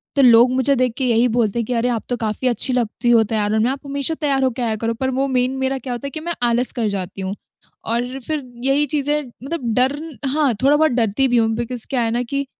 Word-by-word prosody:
तो 280 - +4
लोग 240 -1 +6
मुझे 270 +2 +3
देख 250 -2 +1
के 265 - -1
यही 235 0 +3
बोलते 235 -2 +1
हैं 230 - -1
कि 250 - -3
अरे, 240 +1 0
आप 230 -3 -2
तो 245 - 0
काफ़ी 220 +3 -2
अच्छी 250 +1 +2
लगती 240 0 -1
हो 230 -2 +5
तैयार 210 -1 -1
होने 220 0 +2
में 245 - +1
आप 275 - -5
हमेशा 280 +2 0
तैयार 275 -3 +1
हो 260 - +3
के 250 +2 -6
आया 225 -2 0
करो। 230 +1 -2
पर 260 +3 -2
वो 265 +1 0
मेन 255 -1 +1
मेरा 265 0 -1
क्या 255 -1 -5
होता 260 +4 -5
है - - -5
कि 310 - -6
मैं 340 +2 -3
आलस 240 +1 +5
कर 225 - +1
जाती 195 -1 -5
हूँ 190 +1 -4 0.5
और 245 +3 -2
फिर 310 -2 -2 0.2
यही 275 +2 +2
चीज़ें 295 0 0 0.2
मतलब 270 -6 -3
डर 255 +4 +2 0.3
हाँ, 285 -1 +1
थोड़ा 280 +2 +5
बहुत 315 -1 +3
डरती 235 +2 +1
भी 245 -1 +2
हूँ। 225 -1 +3
बिकॉज़ 240 0 -2
क्या 255 -3 0
है 225 -1 0
ना 240 +2 0
कि 280 +3 -3
250 Hz, 265 wpm, -20 LUFS, 230-270 Hz, 0.5 s, लोग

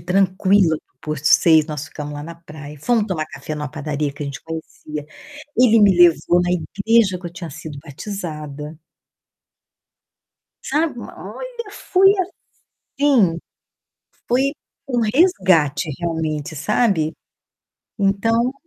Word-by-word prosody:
tranquila 185 -1 +3
para - - -19
o - - -52 0.2
posto 150 +1 -5
6, 160 -2 +6
nós 150 -2 -5
ficamos 150 -1 -7
lá 145 - -6
na 170 +1 -8
praia. 150 -3 -11
Fomo 225 +2 +1
tomar 160 -5 -2
café 155 - -7
numa 150 -1 -4
padaria 150 -1 -3
que 145 - -7
a - - -4
gente 140 0 -7
conhecia. 155 -2 -7 0.5
Ele 230 -3 +5
me 200 -3 +5
levou 175 0 +5
na 175 - -1
igreja 200 +3 +2
que 175 - -8
eu 170 - -8
tinha 170 -1 -7
sido 155 -1 -8
batizada. 150 -3 -6 1.9
Sabe, 300 -2 -1
olha, 485 - -8
foi 385 0 +4 0.7
assim, 250 - +2 0.9
foi 265 +3 +2 0.4
um 245 -3 +1
resgate 190 - +3
realmente, 160 -3 -3
sabe. 170 - +1 0.9
Então 225 +5 +2
170 Hz, 125 wpm, -20 LUFS, 155-220 Hz, 1.9 s, 6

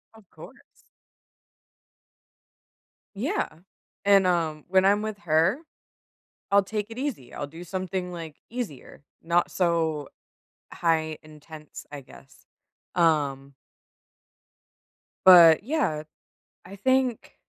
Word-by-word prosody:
Of 215 -5 -19
course. - - -13 2.6
Yeah. - - -1 0.6
And, 200 -2 +5
um, 160 -4 -1
when 190 0 +4
I'm 205 +1 +4
with 215 -2 -5
her, 170 - +2 0.9
I'll 200 0 +5
take 210 +1 -4
it 225 - -10
easy, 245 - -5
I'll 145 - -5
do 165 +4 -11
something, 185 0 -4
like, 160 -3 -8
easier, 220 - -7 0.2
not 170 +1 +1
so, 160 -5 0 0.7
high 160 -2 0
intense, 155 0 -12
I 145 -2 -8
guess. 130 +1 -18 0.5
Um 140 -5 +1 1.7
but, 170 -2 +9
yeah, 245 - -1 0.6
I 195 +2 -11
think 260 +2 0
170 Hz, 100 wpm, -26 LUFS, 155-200 Hz, 2.6 s, but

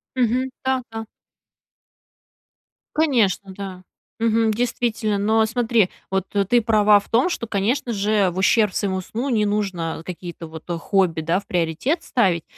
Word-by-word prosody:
Мгм, 255 +1 +1
да, 260 -1 +1
да. 225 0 -5 1.9
Конечно, 225 - +2
да, 190 -2 -8 0.4
мгм, 225 0 +2
действительно. 225 -2 -1
Но 220 +2 +3
смотри, 225 -3 +2 0.2
вот 190 -1 0 0.2
ты 240 +3 +4
права 210 -2 +5
в 200 - -15
том, 245 +10 +3
что, 235 -9 -3
конечно 230 +5 0
же, 205 -2 +2
в 175 - -7
ущерб 210 +2 +3
своему 190 -2 -1
сну 235 +8 -4
не 220 -4 +2
нужно 190 -6 -2
какие-то, 175 -1 -7
вот, 160 0 -10
хобби, 175 -1 +1
да, 165 +4 +1
в 200 - -16
приоритет 180 - -1
ставить. 185 - +1
210 Hz, 145 wpm, -22 LUFS, 190-235 Hz, 1.9 s, права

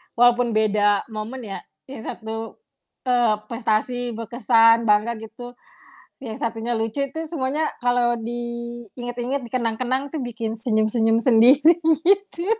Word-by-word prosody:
walaupun 245 -1 +3
beda 205 -1 +2
momen 220 +4 -6
ya 200 -4 -6 0.3
yang 250 -5 -9
satu, 225 - -7 0.5
eee, 240 -3 +3
prestasi, 235 +1 -1
berkesan, 230 0 +3
bangga 215 +2 +2
gitu 245 +3 -10 0.7
yang 225 -3 -6
satunya 230 0 -2
lucu 225 +5 -2
itu 320 +2 -5
semuanya 300 0 -1 0.2
kalau 245 -1 +2
diinget-inget, 240 +2 -5
dikenang-kenang 255 +4 -2
tuh 295 - -2
bikin 230 -2 -4
senyum-senyum 225 0 +1
sendiri 255 +8 +6 0.3
gitu. 395 -2 +1
235 Hz, 115 wpm, -22 LUFS, 225-250 Hz, 0.7 s, sendiri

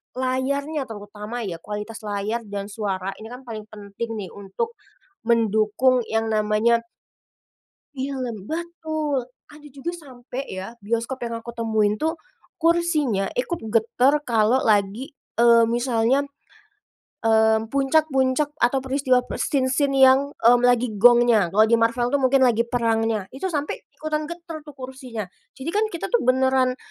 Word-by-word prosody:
layarnya 275 +4 -1
terutama, 210 +2 -7
ya, 180 -5 -4
kualitas 210 +5 -6
layar 210 +3 -2
dan 200 0 -5
suara 195 -3 -3
ini 220 - -9
kan 250 +2 -9
paling 215 -2 -7
penting 215 +2 -7
nih 195 - -6
untuk 205 - -5 0.5
mendukung 225 +2 +3
yang 225 0 -1
namanya 215 +2 +2 1.2
film 260 -6 -4
betul, 315 -3 -3 0.2
ada 295 0 -14
juga 280 +5 -4
sampai 255 -4 -8
ya, 190 0 -6
bioskop 230 +4 -3
yang 230 -1 -4
aku 235 - -10
temuin 215 -2 +1
tuh 320 +7 0 0.5
kursinya 310 - +1
ikut 300 +7 -2 0.2
getar 250 +6 +3
kalau 235 -1 +2
lagi, 210 +5 +1 0.3
eee, 235 -1 +6
misalnya, 240 +2 +1 1.0
mmm, 220 0 +3
puncak-puncak 275 0 +2
atau 245 +3 +3
peristiwa 260 -2 +2
pas - - -6
scene-scene 275 +1 +1
yang, 265 0 +7 0.2
mmm, 240 +1 +5
lagi 245 -1 +3
gongnya. 235 -2 +5
Kalau 210 +4 +5
di 230 - +3
Marvel 230 +1 +2
tuh 285 - +2
mungkin 260 +1 +4
lagi 235 -2 +3
perangnya, 225 -3 0
itu 325 +8 -3
sampai 295 -3 -2 0.2
ikutan 305 -1 -2
getar 335 -2 -7
tuh 295 -2 -13
kursinya, 255 -4 -7 0.3
jadi 270 +5 -4
kan 420 +1 +2
kita 340 - -4
tuh 480 - +4
beneran 260 0 +2
245 Hz, 140 wpm, -23 LUFS, 220-275 Hz, 1.2 s, yang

